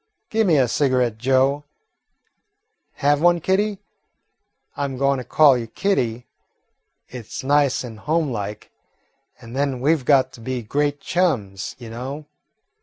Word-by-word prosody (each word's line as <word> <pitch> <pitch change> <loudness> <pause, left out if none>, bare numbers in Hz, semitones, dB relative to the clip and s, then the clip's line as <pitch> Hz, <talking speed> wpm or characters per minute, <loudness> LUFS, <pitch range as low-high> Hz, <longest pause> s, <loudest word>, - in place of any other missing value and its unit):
Gi' 225 0 +2
me 170 -7 +3
a 130 -2 +3
cigarette, 125 -3 +1
Joe. 135 +3 +2 1.3
Have 145 +1 +1
one, 175 0 +4
Kitty? 200 +4 0 1.0
I 145 - -2
'm 135 -2 -5
goin' 140 0 +1
to - - -5
call 145 +1 +5
you 120 -2 -3
Kitty. 120 - -1 0.8
It 125 -4 -9
's - - -6
nice 140 -1 +2
and 115 -3 -9
homelike, 120 -10 -2 0.7
and 115 +2 -11
then 135 -2 -1
we 145 +6 +3
've 155 -5 -2
got 135 -2 +4
to 115 - -14
be 125 0 -4
great 145 +5 -1
chums, 110 - -1
you 120 -3 -10
know." 135 +6 -6
135 Hz, 145 wpm, -22 LUFS, 120-150 Hz, 1.3 s, call